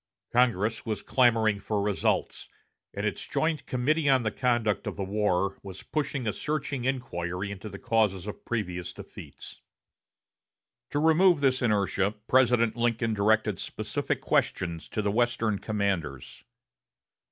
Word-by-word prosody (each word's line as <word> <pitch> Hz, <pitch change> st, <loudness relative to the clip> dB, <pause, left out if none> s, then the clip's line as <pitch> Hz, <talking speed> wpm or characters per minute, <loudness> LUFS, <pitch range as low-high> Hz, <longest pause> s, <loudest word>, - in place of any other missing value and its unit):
Congress 115 Hz, -3 st, +2 dB
was 110 Hz, -4 st, -3 dB
clamoring 115 Hz, -5 st, +3 dB
for 105 Hz, +1 st, -2 dB
results, 100 Hz, -1 st, -1 dB, 0.4 s
and -, -, -4 dB
its -, -, -2 dB
joint 160 Hz, -3 st, -1 dB
Committee 145 Hz, +4 st, +1 dB
on 130 Hz, -2 st, +4 dB
the 110 Hz, -, 0 dB
Conduct 120 Hz, -4 st, 0 dB
of -, -, -3 dB
the 100 Hz, -, -3 dB
War 95 Hz, -1 st, 0 dB
was 95 Hz, -2 st, -9 dB
pushing 140 Hz, -4 st, -2 dB
a 105 Hz, -, 0 dB
searching 145 Hz, -4 st, -3 dB
inquiry 100 Hz, -8 st, -2 dB
into 100 Hz, +2 st, -7 dB
the 100 Hz, -, -8 dB
causes 105 Hz, -5 st, +1 dB
of 105 Hz, -, -7 dB
previous 90 Hz, -6 st, -3 dB
defeats. -, -, -11 dB, 1.3 s
To -, -, -2 dB
remove 160 Hz, +2 st, +5 dB
this 135 Hz, -1 st, +2 dB
inertia, 100 Hz, -3 st, +1 dB
President 120 Hz, -3 st, +3 dB
Lincoln 115 Hz, -1 st, 0 dB
directed 105 Hz, -1 st, +2 dB
specific -, -, -3 dB
questions 85 Hz, -2 st, -1 dB
to 110 Hz, -, -2 dB
the 100 Hz, -, +1 dB
Western 115 Hz, -2 st, +1 dB
commanders. 95 Hz, -, -3 dB
110 Hz, 135 wpm, -28 LUFS, 100-125 Hz, 1.3 s, remove